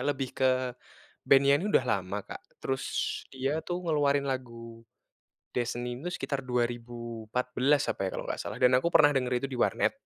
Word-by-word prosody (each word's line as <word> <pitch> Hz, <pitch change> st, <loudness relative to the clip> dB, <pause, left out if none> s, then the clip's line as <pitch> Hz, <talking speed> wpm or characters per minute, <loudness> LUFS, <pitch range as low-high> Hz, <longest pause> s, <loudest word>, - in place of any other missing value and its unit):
lebih 135 Hz, -2 st, -1 dB
ke 130 Hz, -, +2 dB, 0.8 s
band-nya 140 Hz, +1 st, +6 dB
ini 170 Hz, +8 st, -1 dB
udah 130 Hz, -, +4 dB
lama, 95 Hz, 0 st, -1 dB
Kak, -, -, -8 dB, 0.2 s
terus 130 Hz, -1 st, -2 dB, 0.5 s
dia 135 Hz, +1 st, -2 dB, 0.2 s
tuh 175 Hz, 0 st, -1 dB
ngeluarin 140 Hz, -2 st, +2 dB
lagu 115 Hz, -3 st, -7 dB, 0.7 s
Destiny 120 Hz, 0 st, -2 dB
ini 165 Hz, -, -8 dB
tuh 180 Hz, -, -4 dB
sekitar 140 Hz, -1 st, -2 dB
2014 120 Hz, +2 st, -1 dB
apa -, -, -5 dB
ya -, -, 0 dB
kalau -, -, -4 dB
nggak -, -, -4 dB
salah, -, -, -5 dB
dan 125 Hz, -, +6 dB
aku 170 Hz, -, +1 dB
pernah 150 Hz, -3 st, +7 dB
denger 125 Hz, -2 st, 0 dB
itu 135 Hz, -, -1 dB
di 125 Hz, -, -4 dB
warnet. -, -, +2 dB
130 Hz, 175 wpm, -29 LUFS, 120-140 Hz, 0.8 s, pernah